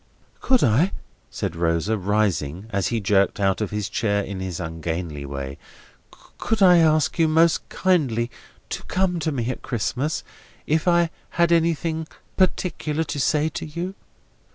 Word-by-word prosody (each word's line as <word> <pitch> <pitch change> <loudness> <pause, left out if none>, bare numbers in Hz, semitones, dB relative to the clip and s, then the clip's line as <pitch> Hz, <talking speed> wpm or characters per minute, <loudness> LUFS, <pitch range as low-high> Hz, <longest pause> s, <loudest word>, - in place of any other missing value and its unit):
"Could 255 -2 +3
I," 140 - +3 0.4
said - - -4
Rosa, 85 +5 +1
rising, 100 -4 0
as 100 -2 0
he 115 - 0
jerked 100 -1 +2
out 95 0 +1
of 105 - -1
his 105 -2 -2
chair 100 0 0
in 95 -1 -6
his 95 -3 -4
ungainly 80 -2 -4
way: 70 0 -6 0.8
"could 220 -3 +1
I 180 -2 +7
ask 155 0 +3
you, 165 - +5
most 165 +1 +3
kindly 130 -11 +1 0.4
to - - -3
come 180 -2 0
to 160 0 -1
me 120 -5 -2
at - - -7
Christmas, 130 +6 -2 0.4
if 160 +3 0
I 170 -1 +3 0.3
had 170 0 +4
anything 165 -1 +1 0.3
particular 170 -4 0
to 145 -2 -4
say 150 +2 +2
to - - -6
you?" 170 +5 -4
125 Hz, 155 wpm, -23 LUFS, -, 0.8 s, I